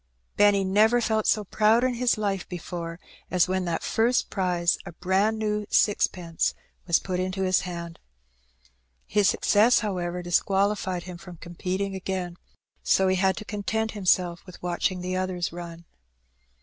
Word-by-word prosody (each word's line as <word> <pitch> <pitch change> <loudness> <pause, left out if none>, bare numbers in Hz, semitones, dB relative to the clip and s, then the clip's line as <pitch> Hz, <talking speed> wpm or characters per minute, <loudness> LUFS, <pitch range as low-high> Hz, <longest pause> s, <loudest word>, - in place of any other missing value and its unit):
Benny 205 -1 +4
never 215 +5 +4
felt 220 -2 0
so 215 - +2
proud 215 +4 +3
in 255 -1 +1
his 240 -1 +1
life 200 -3 -2
before 170 -1 -6 0.3
as 180 -2 +3
when 185 0 -1
that 170 -1 -2
first 235 +2 +1
prize 175 -3 +1
— - - -30
a - - -8
brand 190 +5 +1
new 210 -1 -2
sixpence 180 -5 +1 0.2
— - - -29
^was 170 - +3
put 185 -1 -2
into 185 +1 -2
his 185 0 +3
hand. 170 -2 -6 1.1
His 205 -2 +3
success, 220 +4 +4
however, 180 -4 -3
disqualified 190 0 0
him 180 -2 -9
from 180 -2 -11
competing 185 +4 -4
again, 185 -2 -4 0.4
so 190 - +3
he 185 - +2
had 190 0 +2
to 215 - -7
content 220 +1 -2
himself 180 -4 +1
with 180 - -13
watching 180 +1 -1
the 180 +1 -3
others 185 -2 -2
run. 170 -1 -8
185 Hz, 160 wpm, -26 LUFS, 175-210 Hz, 1.1 s, Benny